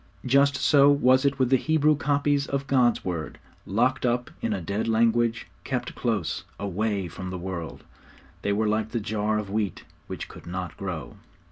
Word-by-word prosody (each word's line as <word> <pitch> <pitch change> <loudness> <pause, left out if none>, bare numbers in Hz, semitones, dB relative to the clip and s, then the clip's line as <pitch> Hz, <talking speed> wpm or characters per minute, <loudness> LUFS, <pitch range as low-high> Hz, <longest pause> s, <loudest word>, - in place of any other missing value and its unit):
Just 140 +2 +4
so 140 0 +5
was 130 -1 +4
it 140 0 +2
with 130 -1 +1
the 130 - +6
Hebrew 155 +2 +3
copies 145 +1 +1
of 140 0 -2
God's 125 -4 +2
Word. 85 -5 -4 0.3
Locked 125 +6 +1
up 120 0 0
in 115 - -1
a 100 - -1
dead 100 +6 -2
language, 115 +1 +2 0.2
kept 125 -2 -3
close, 110 -8 -2 0.2
away 100 0 -1
from 90 +2 -7
the 90 - -4
world, 90 -3 -6 0.6
they 100 - 0
were 105 +2 +1
like 110 0 0
the 120 - -2
jar 105 0 -1
of 105 -2 -4
wheat 105 -3 -2 0.2
which - - -6
could - - -13
not 90 -1 -5
grow. - - -6
115 Hz, 175 wpm, -26 LUFS, 100-130 Hz, 0.6 s, the